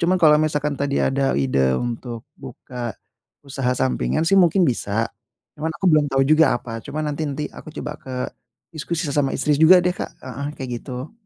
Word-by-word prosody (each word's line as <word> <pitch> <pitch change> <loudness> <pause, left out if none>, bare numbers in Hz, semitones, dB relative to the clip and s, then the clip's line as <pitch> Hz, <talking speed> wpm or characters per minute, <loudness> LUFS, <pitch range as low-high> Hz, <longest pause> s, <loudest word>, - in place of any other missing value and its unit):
Cuman 180 +2 +3
kalau 155 -3 +5
misalkan 150 -1 0
tadi 140 0 0
ada 135 - +1
ide 65 -1 +2
untuk 120 - -4 0.2
buka, 120 -4 -7 0.5
usaha 135 -2 -1
sampingan 145 +4 0
sih 195 +3 +3
mungkin 180 +1 +4
bisa, 115 -3 0 0.5
cuman 155 +2 -2
aku - - -7
belum 150 -1 +4
tau 135 0 +3
juga 155 -1 +4
apa, 115 -2 -7
cuman 150 0 -3
nanti 155 - -4
nanti 145 +2 -3
aku - - -11
coba 150 - -4
ke 130 - -9 0.6
diskusi 165 +2 -3
sama 140 -2 +1
istri 150 +2 +1
juga 175 +4 +8
deh 180 - +2
Kak, - - -5
heeh, 140 +2 -5
kayak 130 -2 -6
gitu. 130 - -7
140 Hz, 180 wpm, -22 LUFS, 125-155 Hz, 0.6 s, juga